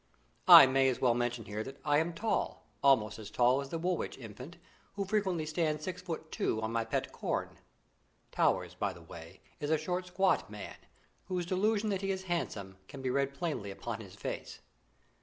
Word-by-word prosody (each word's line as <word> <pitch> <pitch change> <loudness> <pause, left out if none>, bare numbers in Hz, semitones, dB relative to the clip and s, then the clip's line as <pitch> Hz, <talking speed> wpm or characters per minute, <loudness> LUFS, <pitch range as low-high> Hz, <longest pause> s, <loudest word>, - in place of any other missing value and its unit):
I - - +12
may 135 0 +3
as 125 - -2
well 125 -2 +4
mention 120 -1 -1
here 105 +1 -4
that 135 +3 -9
I 145 0 +4
am 165 +2 0
tall, 215 +7 -2 0.2
almost 110 -6 +3
as 105 -2 -8
tall 125 +4 +3
as 140 - -7
the 165 - -3
Woolwich 175 +1 -2
Infant, 125 - -10 0.4
who 200 -1 -2
frequently 190 -5 0
stands 155 -1 -1
six 180 +1 -4
foot 165 -3 -6
two 110 - 0
on 110 - -1
my 115 0 0
pet 115 - -2
corn - - -3 0.7
(Towers, - - +1
by - - -2
the 85 - -13
way, 80 0 -11 0.2
is 145 - -3
a 160 - +4
short 180 +4 -3
squat 190 +1 +1
man, - - -8 0.5
whose 180 -2 -2
delusion 210 +4 +1
that 195 -1 -1
he 195 - -2
is 190 -1 -2
handsome 105 - -3
can 135 -2 -9
be 130 - 0
read 140 +1 0
plainly 140 - -3
upon 95 - -5
his - - -11
face). - - -6
150 Hz, 195 wpm, -32 LUFS, 120-180 Hz, 0.7 s, I